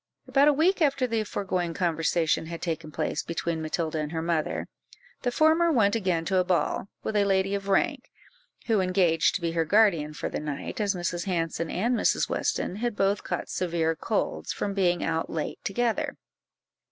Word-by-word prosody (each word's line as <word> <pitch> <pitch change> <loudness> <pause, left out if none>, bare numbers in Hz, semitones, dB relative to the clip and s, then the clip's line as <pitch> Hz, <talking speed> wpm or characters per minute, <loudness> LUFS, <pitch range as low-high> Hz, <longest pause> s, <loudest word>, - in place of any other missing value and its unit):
About 280 +1 +4
a - - +7
week 345 +6 +2
after 275 -4 +3
the 225 -3 0
foregoing 185 -5 -2
conversation 165 -2 +1
had 170 0 -6
taken 160 -2 -3
place 150 - -2
between 170 -1 -3
Matilda 160 0 -2
and 150 0 -3
her 160 -1 -2
mother, 165 -2 -1 0.5
the 245 - 0
former 320 +5 +4
went 215 -7 +3
again 180 -6 0
to 190 +1 +1
a - - +3
ball, 180 +1 0 0.2
with 220 - -3
a 205 - +4
lady 195 0 +1
of 200 0 -3
rank, 195 - +1 0.6
who 220 -4 +2
engaged 180 -3 +2
to 200 - -2
be 170 -1 -1
her 165 0 +1
guardian 165 -5 +3
for - - -3
the - - -3
night, 150 +7 -4
as 200 -1 +1
Mrs. 175 -1 -2
Hanson 165 -3 -1
and 235 +6 0
Mrs. - - +2
Weston 185 - -1
had 240 0 -2
both 195 0 +1
caught - - -3
severe 165 -2 0
colds, 215 +5 -2
from 200 - -2
being 180 -3 +1
out 165 0 -1
late 160 -2 -4
together. 230 +3 -1
185 Hz, 185 wpm, -27 LUFS, 165-210 Hz, 0.6 s, a